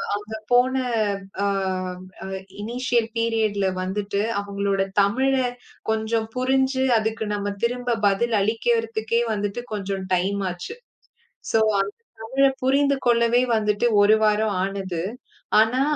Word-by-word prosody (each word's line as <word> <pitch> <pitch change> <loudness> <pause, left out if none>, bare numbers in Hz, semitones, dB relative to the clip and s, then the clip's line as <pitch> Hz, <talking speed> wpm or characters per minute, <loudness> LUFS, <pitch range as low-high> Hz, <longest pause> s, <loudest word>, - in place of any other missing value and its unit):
அங்க 210 +2 -7 0.2
போன 250 +2 +4 0.7
அ - - +2 0.8
அ - - -6 0.4
இனிஷியல் 240 +1 0
பீரியட்ல 220 -4 +1
வந்துட்டு 200 +2 -2 0.2
அவங்களோட 200 -1 -1 0.2
தமிழே 260 +5 +2 0.4
கொஞ்சம் 220 0 0
புரிஞ்சு 265 +1 +1
அதுக்கு 220 0 -1
நம்ம 205 0 -2
திரும்ப 245 0 0
பதில் 220 +3 +1
அளிக்கறதுகே 225 +1 0
வந்துட்டு 205 +3 -3
கொஞ்சம் 195 -2 -3
டைம் 195 +3 +1
ஆச்சு. 180 - -7 0.8
சோ, 225 - +4 0.2
அந்த 200 +1 -4 0.3
தமிழ 265 +5 +2 0.2
புரிந்து 280 +1 +3
கொள்ளவே 235 +1 +4
வந்துட்டு 210 +1 +1 0.2
1 215 +2 +6
வாரம் 210 -1 +2
ஆனது. 190 -4 -4 0.6
ஆனா, 245 +4 +2
220 Hz, 115 wpm, -23 LUFS, 200-240 Hz, 0.8 s, 1